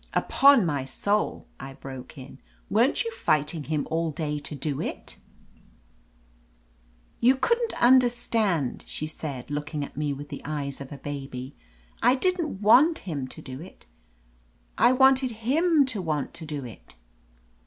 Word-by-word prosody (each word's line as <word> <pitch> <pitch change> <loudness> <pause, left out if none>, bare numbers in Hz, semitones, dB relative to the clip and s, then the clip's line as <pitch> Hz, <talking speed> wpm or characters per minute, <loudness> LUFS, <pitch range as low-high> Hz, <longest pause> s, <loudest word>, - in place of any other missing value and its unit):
"Upon 275 -7 +5
my 145 -5 -1
soul 200 +11 -1
!" - - -36
I 135 0 -8
broke 130 +1 -10
in. 135 0 -11 0.3
"Weren't 235 - +3
you 460 - -4
fighting 155 - 0
him 150 -1 -2
all 165 0 0
day 150 -1 -3
to 145 +1 -6
do 140 0 -3
it - - -6 0.6
?" - - -35
"You 255 +3 +5
couldn't 470 - 0
understand,'* 235 - +2
she 155 - -4
said, 145 -4 -6
look 150 +2 -4
ing 145 -1 -1
at - - -14
me 150 0 -1
with 140 +1 -7
the - - -7
eyes 140 -2 -4
of 135 - -9
a 145 - -7
baby. 135 -2 -7 0.5
"I 255 - +5
didn't 325 - -1
want 285 +10 +6
him 145 -8 -3
to - - -12
do 130 +2 -8
it; 185 - -13 0.9
I - - +5
wanted 265 -1 +4
him 315 +2 +3
to 230 -7 -2
want 155 -5 -2
to 160 - -9
do 145 -3 -5
it." 115 - -13
150 Hz, 160 wpm, -26 LUFS, -, 0.9 s, want